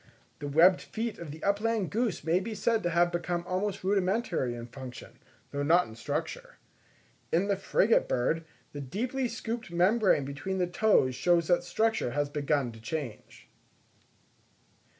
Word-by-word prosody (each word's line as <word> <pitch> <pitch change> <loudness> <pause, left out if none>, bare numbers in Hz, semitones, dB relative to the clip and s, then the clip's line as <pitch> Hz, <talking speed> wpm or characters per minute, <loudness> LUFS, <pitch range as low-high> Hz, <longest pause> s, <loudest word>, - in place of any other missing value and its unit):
The 145 - -5
webbed 170 +6 +5
feet 230 0 -4
of 170 -3 -7
the 155 +2 -9
upland 205 -1 0
goose 225 -6 -1
may 165 +3 +2
be 215 +3 -5
said 225 +2 +1
to 175 - 0
have 175 +1 +3
become 175 0 -2
almost 190 +2 -2
rudimentary 190 - 0
in 120 0 -7
function, 125 0 -10 0.3
though 140 - -2
not 170 +5 +4
in 110 - -11
structure. 115 - -4 0.8
In 175 +5 +2
the 200 - +2
frigate 200 +3 +2
bird, 160 +7 0 0.3
the 145 - -5
deeply 240 - -2
scooped 230 -1 -5
membrane 180 - +3
between 145 +8 -4
the 180 - +2
toes 175 -7 +3
shows 170 +6 +2
that 175 - +3
structure 220 - 0
has 145 -1 +1
begun 145 -3 0
to 115 -1 -13
change. 125 -3 -6
175 Hz, 155 wpm, -29 LUFS, 145-205 Hz, 0.8 s, webbed